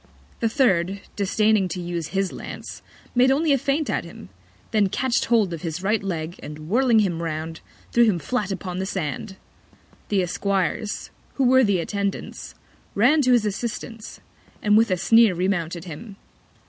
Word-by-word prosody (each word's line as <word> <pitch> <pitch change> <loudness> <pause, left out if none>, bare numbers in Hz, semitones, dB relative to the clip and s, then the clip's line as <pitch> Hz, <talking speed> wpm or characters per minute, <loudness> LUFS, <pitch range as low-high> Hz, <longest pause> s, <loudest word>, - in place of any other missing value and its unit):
The 230 - +1
third, 200 -6 +1
disdaining 210 0 +2
to 180 +1 -5
use 170 -2 -3
his 195 +1 -1
Lance, - - -8 0.3
made 250 +1 +4
only 290 +3 +3
a - - +4
Feint 280 +3 0
at - - -1
him: 170 - -11 0.4
Then 210 -3 +3
catch'd 250 +5 0
hold 215 -7 +2
of 165 - -6
his 165 +2 -4
Right 210 +1 +1
Leg, 170 -3 -4
and 150 +1 -8
whirling 235 +2 +4
him 175 -5 -1
round, 160 0 -4 0.3
threw 235 0 +5
him 210 -6 +2
flat 205 - -2
upon 185 -1 -4
the 190 - -2
Sand. 190 +2 -4 0.7
The 195 -3 +2
Esquires, 195 +3 -2 0.2
who 275 - +1
were 260 +1 +5
the 200 -4 +2
Attendants, 200 +3 -4 0.4
ran 260 +9 +4
to 255 -2 +3
his 235 -3 +3
Assistance, 225 +1 -5 0.4
and 210 0 +3
with 225 +1 +5
a 185 - +1
Sneer 225 +2 +5
remounted 175 -2 -1
him. 185 +5 -9
200 Hz, 165 wpm, -23 LUFS, 175-230 Hz, 0.7 s, threw